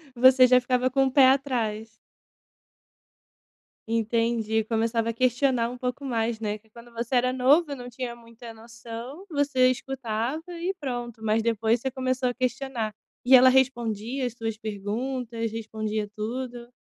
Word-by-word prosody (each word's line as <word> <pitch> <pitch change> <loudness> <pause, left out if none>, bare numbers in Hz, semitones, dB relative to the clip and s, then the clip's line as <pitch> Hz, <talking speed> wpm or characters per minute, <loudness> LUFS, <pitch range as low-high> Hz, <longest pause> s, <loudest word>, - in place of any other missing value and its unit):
Você 255 +1 +7
já 250 0 +6
ficava 250 0 +1
com 270 +1 +2
o 265 - 0
pé 265 0 +7
atrás. 235 -5 0 2.0
Entendi, 230 -1 0
começava 230 +1 0
a - - -2
questionar 250 0 +1
um 250 - -8
pouco 250 +2 -4
mais, 230 -3 -1
né, 210 -1 -2
que 220 +1 -30
quando 235 +2 -15
você 235 +2 -4
era 250 +1 +2
novo 285 +6 +3
eu 280 - -4
não 245 -1 -8
tinha 245 0 -6
muita 230 0 -12
noção, 230 - -9
você 285 -4 +3
escutava 255 +2 -3
e 350 +2 -3
pronto, 240 -5 -5
mas 220 +1 +1
depois 225 0 +1
você 265 - -2
começou 255 0 -1
a 245 - -3
questionar, 250 -3 -2 0.3
e 255 +2 +5
ela 255 +1 +7
respondia 250 -1 +1
as 245 - -4
suas 225 -2 -4
perguntas, 230 +3 -3
respondia 215 -1 -3
tudo? 240 +2 -5
240 Hz, 155 wpm, -26 LUFS, 225-260 Hz, 2.0 s, Você